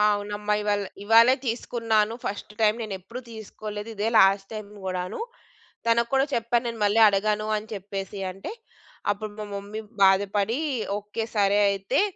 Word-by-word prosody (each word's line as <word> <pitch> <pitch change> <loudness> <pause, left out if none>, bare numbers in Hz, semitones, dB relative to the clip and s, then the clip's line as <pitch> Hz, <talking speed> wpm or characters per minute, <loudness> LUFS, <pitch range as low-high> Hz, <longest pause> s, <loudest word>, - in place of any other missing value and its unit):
అవునమ్మా 205 +1 -2
ఇవాళ 205 -1 +1 0.2
ఇవ్వాళే 230 +4 +6
తీసుకున్నాను. 225 -2 0
ఫస్ట్ 205 +1 -5
టైమ్ 215 +1 +3
నేనెప్పుడూ 210 +4 -7
తీసుకోలేదు. 215 0 -7
ఇదే 215 +2 0
లాస్ట్ 195 0 +4
టైమ్ 215 -1 -7 0.2
గూడాను. 185 -1 -3 0.7
తనకు 235 0 +3
కూడా 270 0 +4
చెప్పాను 235 +1 +1
నేను 230 -1 -5
మళ్ళీ 205 +2 +3
అడగను 210 +1 +1
అని 210 +1 -7
చెప్పేసి 195 0 -5
అంటే, 195 - -7 0.6
అప్పుడు 210 +1 -4
మా 210 - -4
మమ్మీ 205 +2 -6 0.2
బాధపడి 200 +5 +3 0.4
"ఓకే. 210 +2 -4
సరే 200 0 +4
అయితే 195 - 0
210 Hz, 140 wpm, -25 LUFS, 200-225 Hz, 0.7 s, ఇవ్వాళే